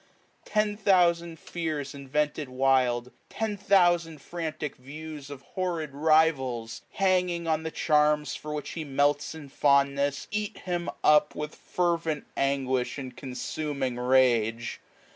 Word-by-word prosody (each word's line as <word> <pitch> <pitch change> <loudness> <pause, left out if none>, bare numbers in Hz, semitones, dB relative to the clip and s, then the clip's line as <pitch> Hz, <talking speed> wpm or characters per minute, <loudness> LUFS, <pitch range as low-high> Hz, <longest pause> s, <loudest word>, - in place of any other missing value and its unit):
Ten 210 -1 0
thousand 170 -4 +3
fears 155 -4 -4
Invented 145 +1 -2
wild, 130 -2 +2 0.2
ten 220 -1 -2
thousand 175 -5 +3
frantic 155 -2 -5
yiewa 155 +4 -8
109a 140 0 -12
Of 140 -2 -8
horrid 170 -6 -2
rivals, 140 -7 +2
hanging 180 -3 +1
on 160 -1 +1
the 160 - -3
charms 150 -1 +2
For 150 - -6
which 150 -1 -4
he 165 - -4
melts 145 +2 +1
in 155 -3 -9
fondness, 140 0 +2
eat 210 0 -2
him 175 -1 -3
up 150 0 +5
With 150 +1 -4
fervent 170 -4 -1
anguish, 135 -2 0
and 130 -3 -7
consuming 130 0 -3
rage. 120 -3 +2
150 Hz, 125 wpm, -27 LUFS, 135-170 Hz, 0.2 s, up